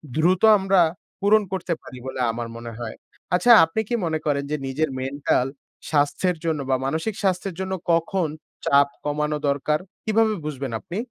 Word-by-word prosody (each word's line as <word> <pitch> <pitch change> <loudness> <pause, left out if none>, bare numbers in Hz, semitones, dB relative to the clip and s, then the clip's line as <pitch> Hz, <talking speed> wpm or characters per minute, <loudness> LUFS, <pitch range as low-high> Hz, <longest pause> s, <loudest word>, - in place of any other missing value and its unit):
দ্রুত 175 +3 +3 0.2
আমরা 195 -1 +3 0.4
পূরণ 210 +2 +4
করতে 180 -2 -1
পারি 130 - -10
বলে 130 - -5
আমার 120 +1 -4
মনে 115 0 -7
হয়। 115 -2 -5 0.4
আচ্ছা 180 +7 +4
আপনি 165 +7 -3
কি 240 - +1
মনে 160 -1 -1
করেন 140 -2 +1
যে, - - +1
নিজের 150 +4 0
মেন্টাল 135 -1 0 0.4
স্বাস্থ্যের 155 +4 +1
জন্য 160 -2 0
বা 130 - +4
মানসিক 160 +9 -2
স্বাস্থ্যের 190 -1 0
জন্য 190 0 -3 0.2
কখন 170 +1 +1 0.4
চাপ 140 0 +5 0.2
কমানো 150 +1 0
দরকার? 145 +2 +1 0.3
কিভাবে 220 0 +3
বুঝবেন 135 -4 -4
আপনি? 175 - -6
155 Hz, 160 wpm, -23 LUFS, 140-185 Hz, 0.4 s, চাপ